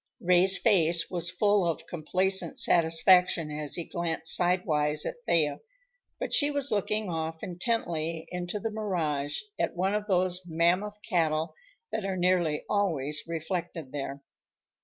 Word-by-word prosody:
Ray's 180 +2 +4
face 170 -6 +2
was 175 -2 -1
full 205 0 +2
of 170 -2 -2
complacent 180 +2 0
satisfaction 170 -1 +4
as 150 -1 -3
he 170 - 0
glanced 165 -2 +1
sidewise 155 -4 +1
at 240 - -6
Thea, 155 -4 +2 0.6
but - - -4
she 290 -1 +4
was 285 -2 -1
looking 210 0 -1
off 160 -1 -4
intently 170 -4 -2
into 180 +3 -4
the 225 +1 -3
mirage, 160 -9 -2 0.2
at - - -1
one 190 +3 0
of 210 0 -2
those 180 -2 +1
mammoth 175 +5 +1
cattle 160 -5 0 0.4
that 220 - -2
are 195 -1 -2
nearly 175 -4 +1
always 150 -8 0
reflected 165 -3 -4
there. 140 -1 -6
175 Hz, 140 wpm, -28 LUFS, 160-190 Hz, 0.6 s, Ray's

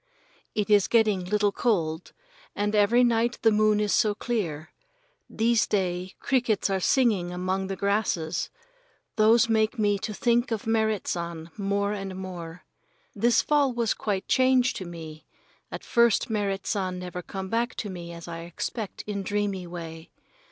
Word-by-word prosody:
It 210 -1 -1
is 205 -2 +5
getting 215 -5 +3
little 205 +2 +1
cold, 165 -9 -1 0.4
and 205 +1 -1
every 215 +4 +4
night 235 0 +2
the 225 - +6
moon 215 0 +3
is 210 -1 +1
so 210 -3 +3
clear. 175 -11 -3 0.6
These 230 0 +2
day 185 -2 -1
crickets 235 -7 +1
are 190 - +1
singing 200 -5 +2
among 185 +2 -2
the 195 - -3
grasses. 190 -5 -1 0.7
Those 225 +2 +5
make 220 +2 +1
me 205 -2 +2
to 215 - -4
think 240 +4 +1
of 225 -3 -3
Merrit 220 -2 0
San 170 -1 -4
more 200 0 -1
and 195 -2 -5
more. 180 -2 -7 0.5
This 235 0 +3
fall 290 -3 +2
was 235 -2 +1
quite 200 -3 -3
changed 255 -1 +3
to 185 - -6
me. 160 -2 -9 0.4
At - - -6
first 235 -1 +3
Merrit 200 -2 -1
San 185 -4 -1
never 180 0 -6
come 190 +1 -6
back 235 +2 -1
to 210 - -4
me 170 -2 -7
as 170 0 -9
I 165 -1 -6
expect 175 +5 -5
in 205 -1 -3
dreamy 200 -2 -2
way. 165 -1 -8
205 Hz, 160 wpm, -26 LUFS, 180-225 Hz, 0.7 s, the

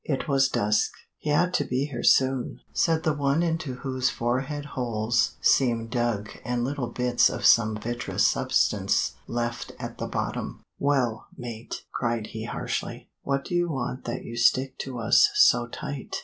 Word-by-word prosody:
It 140 -4 -2
was 135 -2 +3
dusk. 105 -3 +1 0.3
"He 150 - -2
ought 175 +5 +2
to - - +2
be 130 +3 -1
here 135 -5 -5
soon," 130 -1 +2
said 165 -1 +2
the 155 - +2
one 145 +3 +1
into 160 -6 -2
whose 130 -1 +1
forehead 135 +5 -2
holes 120 -1 0
seemed 115 -4 +2
dug 120 -4 -1
and 120 -1 -1
little 135 -1 -2
bits 125 0 +2
of - - -4
some 110 -2 +5
vitreous 120 +2 0
substance - - +1
left 120 0 -3
at - - -7
the - - -3
bottom. - - -4 0.2
"Well, 130 -6 0
mate," 120 -2 -7
cried 115 -3 -2
he 110 0 -5
harshly, - - -4
"what 140 0 -1
do - - -6
you 175 0 +1
want 130 -3 -4
that 120 - -4
you 115 - -7
stick 130 +2 +2
to 130 -2 -5
us 115 - +5
so 420 0 +5
tight?" - - -6
125 Hz, 165 wpm, -26 LUFS, 120-140 Hz, 0.3 s, some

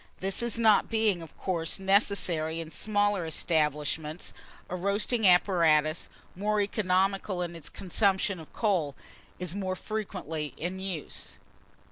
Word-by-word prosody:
This 205 +5 -1
not 220 -3 +4
being, 220 -6 +2
of 165 - -12
course, 170 -4 -1
necessary 190 -5 +2
in 165 -1 -6
smaller 205 +1 +1
establishments, 155 0 -1 0.3
a 180 - -4
roasting 205 +4 +1
apparatus, 165 -4 +4 0.3
more 210 +3 0
economical 195 -2 +1
in 170 -1 -5
its 165 -3 -7
consumption 195 0 +1
of 160 - -12
coal, 175 -11 0 0.4
is 180 -2 -3
more 190 -2 -2
frequently 180 -8 -4
in 180 +3 -4
use. 190 -5 -4
185 Hz, 120 wpm, -29 LUFS, 165-205 Hz, 0.4 s, not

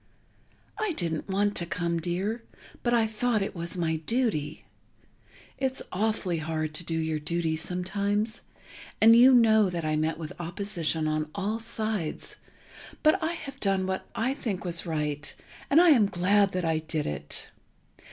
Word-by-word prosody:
I 430 -5 0
didn't 165 - -2
want 205 +1 +1
to 170 - -1
come, 170 -1 -1
dear, 185 +7 -2 0.4
but 240 - 0
I 235 -2 +4
thought 220 0 0
it 195 - -5
was 170 +1 -4
my 160 -2 0
duty. 185 - -1 0.9
It's 265 -1 -1
awfully 195 -4 0
hard 155 -1 -2
to 170 - -3
do 165 -1 -2
your 160 -1 -1
duty 160 +1 -1
sometimes, 200 +6 -1 0.6
and 225 +1 +8
you 250 +3 +8
know 220 -5 +5
that 170 -3 -3
I 155 0 +1
met 155 +1 0
with 160 -2 -6
opposition 170 -3 -1
on 155 0 -1
all 205 +3 -1
sides 220 -7 -2 0.7
but 310 +1 +4
I 325 +1 0
have 280 -4 -8
done 195 -3 +1
what 190 0 -3
I 245 +4 0
think 210 -9 -4
was 170 0 -1
right 150 -2 -2 0.3
and 285 - +6
I 350 0 +7
am 230 -8 +5
glad 195 +2 +2
that 180 -1 -1
I 160 -1 +1
did 155 -1 -3
it.... 75 0 -4
185 Hz, 160 wpm, -28 LUFS, 160-220 Hz, 0.9 s, and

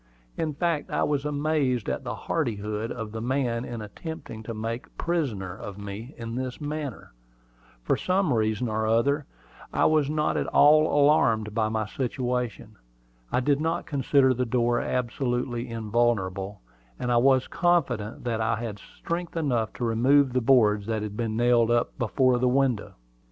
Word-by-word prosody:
In 155 -3 -2
fact, 165 -1 -1
I - - 0
was 145 -1 0
amazed 145 -5 0
at - - -2
the - - -4
hardihood 110 -6 -2
of 110 -3 -5
the 110 0 -5
man 125 -1 0
in 120 -3 -6
attempting 140 0 -8
to 115 +1 -6
make 115 +2 -4
a - - -33
prisoner 120 - -2
of 100 0 -8
me 105 +7 -7
in 115 -1 -6
this 125 0 -4
manner. 150 - -5 0.7
For - - +2
some 185 -5 +1
reason 110 +1 0
or 110 0 -1
other, 140 +6 +2 0.4
I - - +2
was 155 -3 +3
not 150 0 0
at - - -1
all 155 +1 +6
alarmed 130 -7 +3
at 110 -1 +1
my 110 -1 -1
situation. 125 -1 -3 0.5
I 125 - +2
did 145 +2 +1
not 165 +1 -1
consider 135 -2 +3
the 125 +1 -1
door 120 0 +1
absolutely 125 0 -2
invulnerable; 105 -4 -1 0.4
and 125 - -2
I 120 - +4
was 130 +1 +4
confident 170 - 0
that 115 -2 -1
I 115 +1 +1
had 110 -2 -5
strength 170 - -5
enough 125 -9 0
to 120 - -3
remove 130 +4 +3
the 125 - +2
boards 110 -5 +4
that 110 -2 -1
had 105 -1 -5
been 110 -1 -2
nailed 120 -1 +4
up 120 0 +1
before 125 +1 +2
the 125 0 +3
window. 130 -4 0
120 Hz, 165 wpm, -26 LUFS, 110-140 Hz, 0.7 s, all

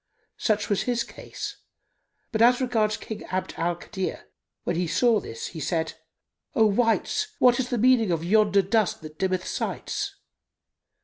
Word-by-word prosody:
Such 210 -2 +1
was 205 - +1
his 240 -1 +1
case; - - -7 0.7
but 220 -3 0
as 245 +1 +6
regards 225 -5 +1
King 220 - -7
Abd 185 0 -3
al 170 +1 0
Kadir, 190 +2 -5 0.4
when 175 - -1
he 175 +1 0
saw 220 +7 +3
this, 115 - -6
he 165 - -8
said, 160 +1 -1 0.6
"O 220 - +5
wights, 230 - +2
what 245 0 +5
is 250 -1 -1
the 245 - 0
meaning 235 -2 +4
of 165 -1 0
yonder 200 0 +4
dust 210 0 +1
that 155 0 -10
dimmeth 185 -1 0
sights?" - - -3
210 Hz, 160 wpm, -26 LUFS, 180-235 Hz, 0.7 s, as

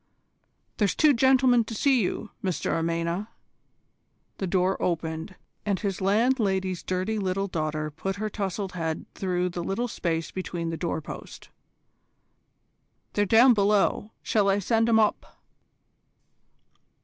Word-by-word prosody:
"There's 205 -3 +1
two 305 -2 +5
gentlemen 255 -1 +4
to 225 - -6
see 270 0 +3
you, 200 +2 -3
Mr 185 -3 -1
Amena." 170 +4 -1 1.1
The 190 - -1
door 185 +1 +1
opened, 165 +1 -2 0.3
and 200 -3 0
his 195 -3 -3
landlady's 195 -3 +1
dirty 185 +4 -2
little 195 0 -1
daughter 155 -4 -2
put 195 +5 -4
her 215 +2 -3
towsled 195 -2 -3
head 160 -3 -3
through 180 -1 -1
the 175 -1 -5
little 230 +8 -1
space 165 -7 -2
behind 175 -3 -4
the - - -3
doorpost. 160 -1 -6 1.6
"They're 205 0 +1
down 240 +5 +7
below; 205 0 +2
shall 205 -3 +2
I 195 - +3
send 225 +3 +1
'em 225 - +5
up?" 215 -1 0
195 Hz, 125 wpm, -26 LUFS, 175-215 Hz, 1.6 s, down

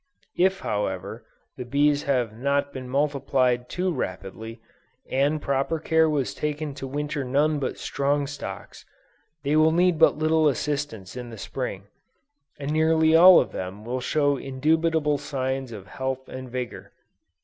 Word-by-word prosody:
If 190 +2 +3
however, 95 -3 -3 0.3
the - - -4
bees 145 +3 +2
have 120 -5 +1
not 140 +3 0
been 130 -1 -7
multiplied 130 -3 +1
too 180 0 -1
rapidly, 100 - -5 0.5
and 140 +4 +1
proper 140 +3 -1
care 160 0 +2
was 145 -4 -1
taken 150 -1 -3
to 135 -1 -6
winter 145 +1 -3
none 145 +4 +1
but 130 - -3
strong 140 +1 0
stocks, 100 -9 -8 0.6
they 145 +2 +1
will 155 +1 +5
need 175 0 +2
but 160 - +5
little 155 0 +3
assistance 140 -8 -2
in 125 -1 -6
the 115 - -9
Spring; 100 -3 -5 0.7
and 145 0 -4
nearly 160 0 +3
all 180 +2 +9
of - - -1
them 95 +3 -6
will 125 +2 -3
show 145 0 +1
indubitable 150 +2 +1
signs 130 -2 -3
of 105 -4 -8
health 130 +6 -4
and 130 -1 -8
vigor. 125 -1 -6
140 Hz, 150 wpm, -25 LUFS, 125-155 Hz, 0.7 s, all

